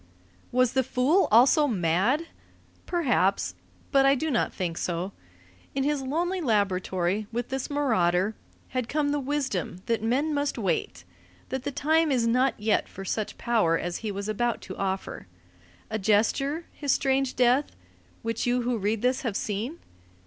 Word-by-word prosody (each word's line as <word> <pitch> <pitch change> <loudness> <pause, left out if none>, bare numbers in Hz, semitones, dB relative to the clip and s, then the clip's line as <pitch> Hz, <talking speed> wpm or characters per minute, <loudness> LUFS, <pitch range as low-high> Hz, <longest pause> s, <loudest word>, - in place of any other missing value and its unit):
Was 255 -1 +2
the 265 - +3
fool 265 +8 +2
also 265 +7 +6
mad? 205 - +1 0.6
Perhaps. 245 - +1 0.4
But 275 -2 +5
I 275 0 +5
do 310 +3 -2
not 240 - +1
think 175 -3 -3
so. 175 +2 -2 0.6
Into 275 0 +1
his 295 -2 0
lonely 345 +7 -1
laboratory, 200 - 0
with 240 +1 -3
this 265 0 -3
marauder, 215 -9 +2 0.4
had 255 -2 -2
come 295 -1 +1
the 290 0 0
wisdom 260 - -2
that 230 -2 0
men 265 +8 +1
must 285 -1 -1
wait, 170 - -2 0.5
that 265 0 -4
the 285 - -1
time 315 +2 +2
is 245 -3 +2
not 250 +2 +2
yet 215 +1 +1
for 195 - -8
such 215 +2 -3
power 215 -9 +2
as 175 +1 -3
he 220 -2 -4
was 200 +1 -4
about 235 +2 0
to 185 - -8
offer. 190 - -3 0.6
A 220 - -1
gesture, 250 - +1
his 285 -2 -2
strange 270 -2 +1
death, 250 +3 +2 0.5
which 230 +1 -2
you 245 0 +1
who 240 -1 0
read 210 +2 -1
this 255 +1 +2
have 230 -7 -3
seen? 220 +12 -3
240 Hz, 160 wpm, -27 LUFS, 200-275 Hz, 0.6 s, also